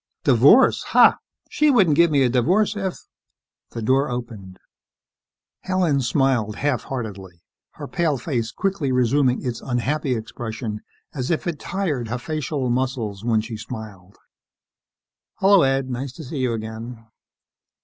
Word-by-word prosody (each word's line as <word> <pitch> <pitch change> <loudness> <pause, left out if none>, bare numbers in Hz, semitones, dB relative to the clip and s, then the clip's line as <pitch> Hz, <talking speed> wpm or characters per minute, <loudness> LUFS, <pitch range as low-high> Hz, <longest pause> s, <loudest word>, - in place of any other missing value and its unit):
"Divorce, - - +5
ha! - - +5 0.3
She 300 - +2
wouldn't 195 - +4
give 170 +2 +5
me 140 -3 +3
a 125 - +3
divorce 180 - +2
if 195 -3 -3 0.4
" - - -67
The 115 - -5
door 135 +5 +2
opened. 115 -7 -7 1.0
Helen 180 -7 0
smiled 125 -4 +1
half 140 -5 -1
heartedly, 95 -9 -7 0.3
her - - -8
pale 160 -5 0
face 120 -4 -3
quickly 190 -9 -2
resuming 125 +1 +2
its 120 -2 -3
unhappy 130 +2 -1
expression 110 -1 -6 0.3
as 130 -2 -4
if 165 - -1
it 170 -4 -3
tired 155 -12 -2
her 120 +3 -3
facial 145 0 -3
muscles 120 -6 -2
when 115 -2 +2
she 110 0 -7
smiled. 105 -5 -9 1.2
"Hello, 195 -1 +5
Ed. 135 -1 +1
Nice 125 +1 -4
to 160 - -10
see 145 +1 -6
you 125 -2 0
again." 115 +1 -7
125 Hz, 140 wpm, -22 LUFS, 115-150 Hz, 1.2 s, Divorce